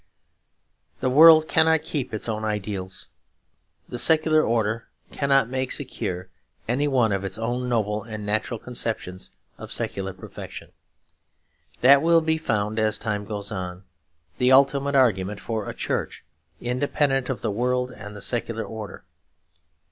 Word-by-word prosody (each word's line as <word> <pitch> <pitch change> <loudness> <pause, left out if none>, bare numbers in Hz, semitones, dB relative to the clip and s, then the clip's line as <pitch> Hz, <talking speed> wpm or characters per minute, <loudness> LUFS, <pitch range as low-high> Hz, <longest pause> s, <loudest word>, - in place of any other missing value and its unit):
The 130 - 0
world 155 +2 +8
cannot 160 -1 +3
keep 140 -5 -3
its 110 +1 -4
own 110 -1 -3
ideals. 100 -3 -4 0.8
The 120 - -5
secular 155 +3 +4
order 115 -2 0 0.2
cannot 135 -3 +2
make 130 +1 -2
secure 90 +1 -4 0.4
any 135 +5 +1
one 125 -6 +2
of 100 -1 -1
its 95 +1 -4
own 120 +2 -2
noble 105 -3 0
and 110 -1 -7
natural 110 +3 -1
conceptions 110 -7 -4 0.3
of - - -9
secular 95 0 -3
perfection. 95 - -10 1.1
That 140 +2 +7
will 165 +1 +4
be 160 0 0
found, 110 -6 -1
as 110 -1 +1
time 105 -2 -3
goes 105 0 -4
on, 90 -2 -5 0.6
the 125 +1 +3
ultimate 140 +1 +4
argument 105 -6 +2
for 110 0 -4
a - - -5
Church - - -3 0.3
independent 135 +2 0
of 130 - -3
the 110 - 0
world 125 +3 0
and 105 -3 -10
the 100 - -8
secular 115 -2 -2
order. 110 -2 -8
115 Hz, 140 wpm, -24 LUFS, 105-135 Hz, 1.1 s, world